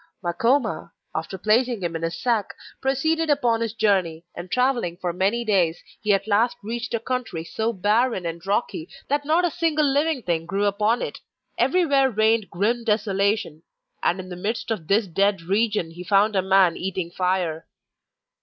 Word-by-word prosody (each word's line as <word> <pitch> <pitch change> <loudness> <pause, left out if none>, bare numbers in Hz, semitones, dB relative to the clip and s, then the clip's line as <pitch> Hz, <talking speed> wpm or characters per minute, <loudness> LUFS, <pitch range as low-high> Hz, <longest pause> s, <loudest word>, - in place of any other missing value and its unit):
Makoma, 220 0 0 0.2
after 165 +4 -4
placing 225 +2 +1
him 170 -1 -2
in 165 - -3
his 165 0 -3
sack, 230 -5 0 0.3
proceeded 315 +5 +1
upon 245 -6 +2
his 230 -1 -2
journey, 180 -7 +1
and 180 - -8
travelling 245 -8 0
for 180 -2 -3
many 200 +7 0
days 180 -6 +2 0.2
he 210 - +1
at 195 0 +2
last 220 +3 +2
reached 235 +3 -3
a - - -1
country 240 -8 -3
so 220 +7 -2
barren 210 0 +1
and 165 0 -5
rocky 195 -5 -1 0.2
that 290 +1 0
not 325 +4 +3
a 345 - 0
single 310 -1 +1
living 285 -1 +1
thing 165 -2 -1
grew 195 +3 0
upon 210 +4 +1
it - - -5 0.4
everywhere 285 -7 +3
reigned 220 -1 +2
grim 225 +7 0
desolation. 200 -6 0 0.4
And 185 - +1
in 185 0 -7
the 180 - -6
midst 210 +5 -3
of 175 -8 -3
this 205 +4 +3
dead 195 0 +1
region 200 -2 0
he 175 +2 -9
found 205 +3 +3
a 190 - +3
man 190 -2 +4
eating 185 -2 -3
fire. 180 -3 -1
205 Hz, 175 wpm, -23 LUFS, 180-240 Hz, 0.4 s, man